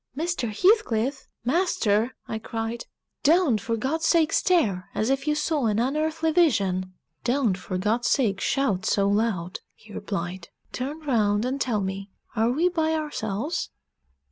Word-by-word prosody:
"Mr. 330 -7 -1
Heathcliff! 270 - +2 0.2
master!" 250 - +1
I 220 - -3
cried. 225 +1 -4 0.4
"Don't, 305 - +3
for 230 +1 -2
God's 300 +8 -1
sake, 325 -2 +3
stare 215 - +2
as 220 +5 +1
if 270 +2 -1
you 300 - +2
saw 300 -4 0
an 210 -1 +1
unearthly 310 +6 0
vision." 195 - +2 0.3
"Don't, 245 -5 +1
for 185 0 -5
God's 215 +6 0
sake, 205 -8 +1
shout 225 -10 0
so 200 -1 +2
loud," 200 -4 0 0.2
he 215 -1 -16
replied. 180 -3 -5 0.2
"Turn 285 +5 -4
round 215 -6 +1
and 270 +2 -2
tell 220 -5 0
me, 195 +1 -4 0.3
are 225 +1 +2
we 310 +8 +2
by 320 -3 +1
ourselves?" 295 - -3
240 Hz, 145 wpm, -25 LUFS, 205-305 Hz, 0.4 s, Don't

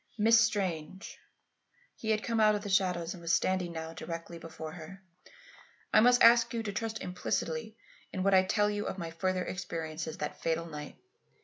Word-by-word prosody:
"Miss 225 +1 +6
Strange" 190 -5 -2 0.8
(he 220 - -6
had 215 0 +1
come 230 -1 -1
out 215 -1 +5
of 205 - -4
the 205 - -5
shadows 180 -3 +1
and 180 - -11
was 170 0 -2
standing 180 0 +1
now 160 0 -6
directly 165 0 -7
before 160 -1 -8
her), 180 +4 -11 0.9
"I - - +7
must 245 +2 +5
ask 235 0 +6
you 230 - -2
to 205 -2 -4
trust 220 +1 -3
implicitly 180 +2 -3 0.3
in 185 - -3
what 195 0 +3
I 190 - +7
tell 205 +2 +1
you 205 0 -3
of - - -4
my 170 -3 -5
further 185 +2 -1
experiences 160 -3 -5
that - - -5
fatal 165 0 0
night. 150 -2 -8
185 Hz, 185 wpm, -31 LUFS, 165-215 Hz, 0.9 s, I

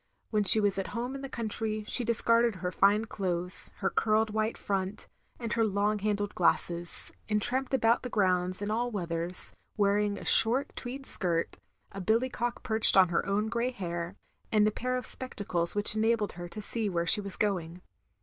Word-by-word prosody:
When 210 -2 +1
she 215 - +7
was 205 -2 0
at 195 - -5
home 245 +3 -3
in 275 - -7
the 275 - -7
country 215 -2 -4
she 250 - +2
dis 230 -1 +3
carded 230 -1 +3
her 180 -1 -4
fine 205 +4 +2
clothes, 180 -4 0
her 190 - 0
curled 220 0 +1
white 220 +1 -2
front, 195 +1 -4 0.3
and 230 -3 -4
her 230 - +1
long 210 0 0
handled 205 0 -2
glasses; 175 0 0 0.2
and 210 -1 +1
tramped 255 +5 -1
about 230 -3 +2
the 250 - -6
grounds 185 -2 0
in 205 - -3
all 240 +3 -1
weathers, 175 -4 -1 0.2
wearing 205 0 +1
a - - -9
short 250 +5 +5
tweed 265 +2 -7
skirt, 170 -7 +2 0.3
a 195 - -7
billycock 235 +4 -1
perched 220 -4 +4
on 185 -2 +6
her 170 - 0
own 205 +2 0
grey 235 +2 -1
hair, 175 -5 -5 0.4
and 210 -1 +3
a - - +1
pair 255 +4 -3
of 250 - -5
spectacles 190 -9 -2
which 205 +1 +4
enabled 220 -1 0
her 175 0 -9
to 215 +3 -8
see 220 0 -3
where 170 -2 -2
she 175 +5 +2
was 200 -2 -5
going. 180 -4 -3
210 Hz, 190 wpm, -29 LUFS, 185-230 Hz, 0.4 s, she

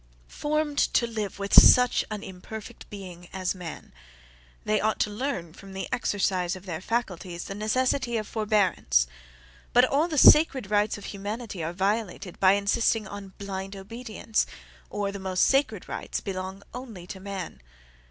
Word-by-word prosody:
Formed 300 0 -1
to 235 - +3
live 215 -4 -4
with 200 0 -4
such 250 -1 +8
an 215 -1 -5
imperfect 195 +3 -9
being 180 -4 -9
as 185 -1 -1
man, 180 -4 -9 0.7
they 215 0 +2
ought 220 0 +1
to 210 - +1
learn 205 - -3
from 195 +1 -12
the 190 - -4
exercise 195 -6 0
of 185 +1 -11
their 170 -3 -4
faculties 185 -6 -3
the - - -6
necessity 240 +3 0
of 215 -1 -3
forbearance; 200 - +2 0.7
but 245 +1 +7
all 285 +5 +2
the 315 -3 -3
sacred 270 -7 +6
rights 210 +1 +2
of 200 - -10
humanity 205 -2 -5
are 160 - -2
violated 195 0 -2
by 190 0 +6
insisting 210 +1 +1
on 195 -1 -8
blind 195 0 -5
obedience; 220 +2 -2 0.4
or, 205 -1 -2
the 200 - -6
most 190 -1 +1
sacred 275 +1 +1
rights - - -4
belong 190 0 -5
ONLY 230 -8 -8
to 190 +1 -8
man. 190 - -6
200 Hz, 155 wpm, -27 LUFS, 190-230 Hz, 0.7 s, such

